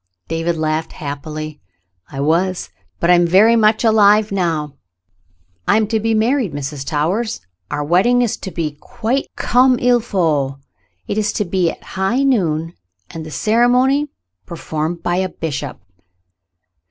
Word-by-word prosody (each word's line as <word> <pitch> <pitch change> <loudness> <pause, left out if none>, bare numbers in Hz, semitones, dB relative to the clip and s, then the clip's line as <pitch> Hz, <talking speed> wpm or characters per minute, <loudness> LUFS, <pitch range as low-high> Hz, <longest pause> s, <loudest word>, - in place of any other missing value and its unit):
David 165 +1 -1
laughed 155 0 -2
happily. 150 +1 -6 0.5
"I 135 - -4
was, 175 +5 0 0.3
but 170 - +3
I - - +8
am 175 0 +4
very 205 +7 +5
much 215 0 +3
alive 215 -1 +4
now. 165 -6 -1 0.9
I - - +4
am 220 - +2
to 220 -1 +1
be 225 +1 0
married, 230 - +1
Mrs. 145 0 -5
Towers; 170 +11 -1 0.3
our 145 0 -2
wed 175 +6 +3
ding 245 0 +3
is 235 - -1
to - - -7
be 165 -4 -3
quite 250 +5 -2
comme 250 +1 +3
il 245 0 +3
faut. 160 - 0 0.5
It 210 - -1
is 210 0 0
to 210 - -1
be 180 -1 +1
at - - -9
high 195 +8 -1
noon, 165 - +1 0.4
and 165 - -7
the 155 - -8
ceremony 245 - +2 0.4
performed 165 0 -4
by 175 0 0
a 190 0 0
bishop." 155 -5 -5
185 Hz, 155 wpm, -18 LUFS, 155-225 Hz, 0.9 s, I